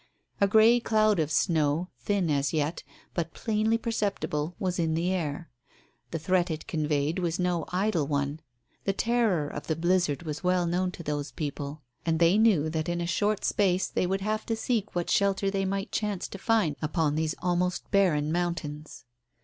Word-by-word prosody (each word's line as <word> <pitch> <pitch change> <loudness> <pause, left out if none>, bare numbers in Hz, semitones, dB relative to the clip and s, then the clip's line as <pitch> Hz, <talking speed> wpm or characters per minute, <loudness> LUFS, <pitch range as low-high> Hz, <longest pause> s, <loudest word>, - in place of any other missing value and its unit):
A 200 - +4
grey 220 +4 +6
cloud 215 -4 +2
of 155 -2 +1
snow, 155 +1 +1
thin 185 +3 0
as 140 +1 +1
yet, 155 +1 -1 0.3
but 165 -2 -3
plainly 220 0 +1
perceptible, 200 -8 -2
was 185 -2 -2
in 160 -1 +1
the 170 +3 0
air. 165 -3 -3 0.6
The 165 - -3
threat 180 +2 +1
it 155 -1 -4
conveyed 150 0 0
was 170 -2 -1
no 180 -3 0
idle 180 -5 0
one. 140 +1 -1 0.5
The 195 - +1
terror 220 -9 +1
of 145 - -7
the 160 - 0
blizzard 175 -2 +1
was 155 0 -5
well 180 -1 +2
known 180 +2 0
to 170 - -8
those 145 -1 -3
people. 145 0 -5 0.2
And 165 -1 +1
they 170 +5 +4
knew 200 -9 +4
that 160 +1 -2
in 175 0 -1
a 170 - -1
short 205 +4 0
space 190 -2 +2
they 180 - -1
would 195 +1 -1
have 215 +2 -1
to 225 - 0
seek 220 -3 -2
what 175 -1 -1
shelter 195 0 +2
they 195 -1 0
might 195 +3 -2
chance 210 -4 -2
to 195 - -8
find 205 -10 +1
upon 155 -1 0
these 155 0 -1
almost 180 0 -1
barren 155 -7 +3
mountains. 160 -5 -3
175 Hz, 180 wpm, -28 LUFS, 155-195 Hz, 0.6 s, grey